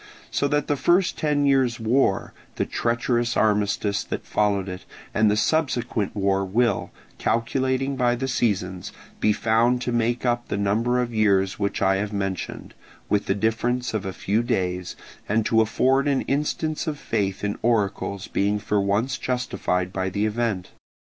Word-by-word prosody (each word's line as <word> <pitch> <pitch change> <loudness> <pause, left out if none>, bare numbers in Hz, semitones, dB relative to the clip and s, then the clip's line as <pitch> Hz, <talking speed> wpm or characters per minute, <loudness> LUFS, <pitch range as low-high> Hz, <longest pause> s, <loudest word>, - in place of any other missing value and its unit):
So 140 - +1
that 145 +1 +1
the 145 - 0
first 175 +6 +2
ten 150 -2 +1
years' 130 -3 +2
war, 115 -2 +1 0.2
the - - 0
treacherous 120 0 0
armistice 105 -1 +1
that - - -5
followed 100 -2 +1
it, 90 -1 -6 0.3
and 110 0 +4
the 105 - +2
subsequent 120 -7 0
war 100 -1 +1
will, 105 +2 +1 0.3
calculating 130 +3 0
by 120 -2 +2
the 130 +2 -3
seasons, 95 -8 -1 0.3
be 105 - +3
found 115 +3 +2
to 125 - -2
make 120 +1 0
up 120 0 0
the - - -2
number 110 +5 +1
of 120 -1 -2
years 100 -3 +2
which 100 -1 -1
I 95 0 +3
have 105 +1 -3
mentioned, 95 -2 -4 0.4
with 105 0 +1
the 95 - +1
difference 115 +4 0
of 110 -3 -1
a - - -2
few 100 +4 0
days, 90 -7 -2 0.3
and 110 +1 +2
to 110 -1 +4
afford 130 +5 +2
an 140 -2 +2
instance 150 +3 -1
of 150 -2 -2
faith 100 -7 -2
in 105 0 -2
oracles 100 -3 0
being 100 +1 0
for 105 0 0
once 105 +7 0
justified 100 -7 -1
by 95 0 -1
the 100 +3 -1
event. 110 -4 -1
110 Hz, 165 wpm, -24 LUFS, 100-125 Hz, 0.4 s, and